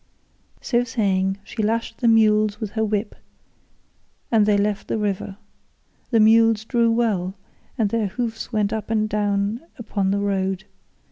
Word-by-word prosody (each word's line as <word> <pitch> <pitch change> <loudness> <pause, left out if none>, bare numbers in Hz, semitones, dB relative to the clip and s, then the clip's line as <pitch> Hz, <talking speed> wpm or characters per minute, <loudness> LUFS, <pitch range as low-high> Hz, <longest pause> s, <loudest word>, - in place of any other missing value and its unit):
So 240 -1 +1
saying 195 -5 0
she 220 - -5
lashed 225 +2 -1
the 240 - +1
mules 215 -2 +4
with 215 -3 -4
her 220 +1 -1
whip 210 0 -1 1.2
and 215 -3 +4
they 205 -1 +4
left 205 0 -1
the - - -1
river. 200 -2 -3 0.7
The 230 - +3
mules 220 0 +5
drew 235 -1 +2
well, 210 -5 0 0.4
and 210 -3 +1
their 225 -3 0
hoofs 225 +3 -4
went 210 -2 0
up 215 -1 -4
and 215 -1 +1
down 205 +2 -1 0.2
upon 205 -4 -2
the 200 - +1
road. 195 -1 -1
215 Hz, 150 wpm, -22 LUFS, 200-225 Hz, 1.2 s, mules